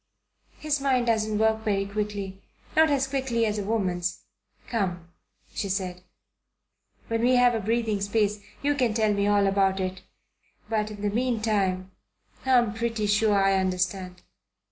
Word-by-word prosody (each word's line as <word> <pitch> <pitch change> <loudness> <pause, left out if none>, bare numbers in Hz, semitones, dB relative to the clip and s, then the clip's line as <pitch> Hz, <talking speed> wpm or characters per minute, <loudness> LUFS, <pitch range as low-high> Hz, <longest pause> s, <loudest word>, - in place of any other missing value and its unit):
His 295 -2 -1
mind 260 -3 +2
doesn't 215 -2 +1
work 220 0 +2
very 195 -2 0
quickly, 200 -1 -4 0.3
not 315 0 +5
as 275 -2 +2
quickly 265 -4 0
as 210 -1 -1
a - - -2
woman's. 185 -5 -1 0.4
Come," 180 -7 -2 0.4
she 200 - -3
said. 185 -2 -3 1.1
"When 230 0 -1
we 250 +2 +4
have 245 -1 +5
a 225 - 0
breathing 220 -1 0
space 205 0 0 0.2
you 290 +1 +3
can 250 -6 0
tell 215 -2 +2
me 200 0 +1
all 205 -1 +3
about 195 -1 +2
it. 185 0 -3 0.7
But 215 -1 -1
in 210 -1 -9
the 205 - +1
meantime 210 -6 0 0.6
I'm 240 -5 +4
pretty 230 -1 -2
sure 210 0 +3
I 195 0 +3
understand." 185 0 -2
210 Hz, 150 wpm, -26 LUFS, 195-230 Hz, 1.1 s, not